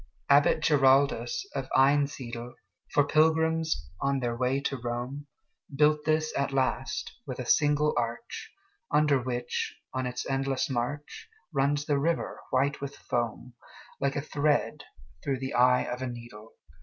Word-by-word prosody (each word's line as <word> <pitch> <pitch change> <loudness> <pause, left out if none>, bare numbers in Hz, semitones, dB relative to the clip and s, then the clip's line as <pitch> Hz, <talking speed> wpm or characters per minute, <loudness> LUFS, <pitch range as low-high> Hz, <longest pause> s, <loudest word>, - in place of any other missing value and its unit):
Abbot 145 +2 +5
Giraldus 140 - +3
of 130 - -4
Einsiedel, 130 -4 +1 0.4
For 145 - +4
pilgrims 160 - +2
on 140 0 +1
their 120 -2 -1
way 130 +3 +1
to 140 - -2
Rome, 125 +4 -4 0.5
Built 150 +1 +3
this 155 0 +1
at 140 0 0
last, 135 0 -1 0.2
with 130 - -5
a 125 - -4
single 150 +2 +3
arch, 120 - -3 0.4
Under 150 -3 +3
which, 120 -1 -3 0.2
on 130 -1 -1
its 125 0 -4
endless 135 0 -1
march, 130 - -4 0.2
Runs 145 +1 +1
the 145 -2 +1
river, 165 +3 -1
white 140 +3 +1
with 140 0 -5
foam, 120 +1 -3 0.5
Like 140 0 0
a 140 - 0
thread 150 0 0 0.4
through 135 -2 -1
the 130 +1 -4
eye 125 +1 +4
of 125 +1 -5
a 130 - -2
needle. 120 -2 -10
135 Hz, 145 wpm, -28 LUFS, 125-145 Hz, 0.5 s, Abbot